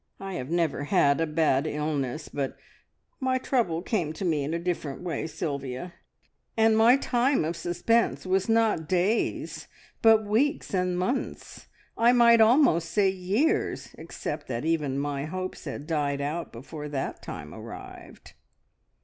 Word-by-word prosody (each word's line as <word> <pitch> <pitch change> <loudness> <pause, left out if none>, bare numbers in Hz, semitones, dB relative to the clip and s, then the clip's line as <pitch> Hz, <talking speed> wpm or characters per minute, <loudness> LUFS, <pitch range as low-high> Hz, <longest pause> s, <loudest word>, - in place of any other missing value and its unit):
"I 195 0 -6
have 130 -6 -5
never 165 -4 0
had 145 -3 +3
a 165 - +1
bad 150 -2 +2
illness, 150 -1 -2
but 140 -2 -4 0.6
my 260 -2 +1
trouble 225 -11 0
came 175 -8 -1
to 190 - -5
me 155 -5 +1
in 145 - -3
a 165 - 0
different 170 -4 -3
way, 170 -2 -3
Sylvia, 140 0 -4 0.6
and 225 0 +4
my 230 +4 +6
time 255 - +1
of 165 +2 -2
suspense 175 +9 0
was 190 +3 +1
not 225 -8 +2
days, 185 +5 0 0.3
but 220 -1 +5
weeks 250 +8 0
and 180 -1 0
months, 190 +10 -3 0.3
I 235 +2 +5
might 235 -2 +6
almost 220 - +4
say 200 +1 +3
years, 210 - 0
except - - -6
that 120 +2 -3
even 150 -5 0
my 140 0 -2
hopes 185 +3 -5
died 145 -2 -2
out 150 +4 -3
before 150 +5 -8
that 140 -2 -4
time - - -8
arrived!" - - -11
175 Hz, 145 wpm, -27 LUFS, 150-220 Hz, 0.6 s, my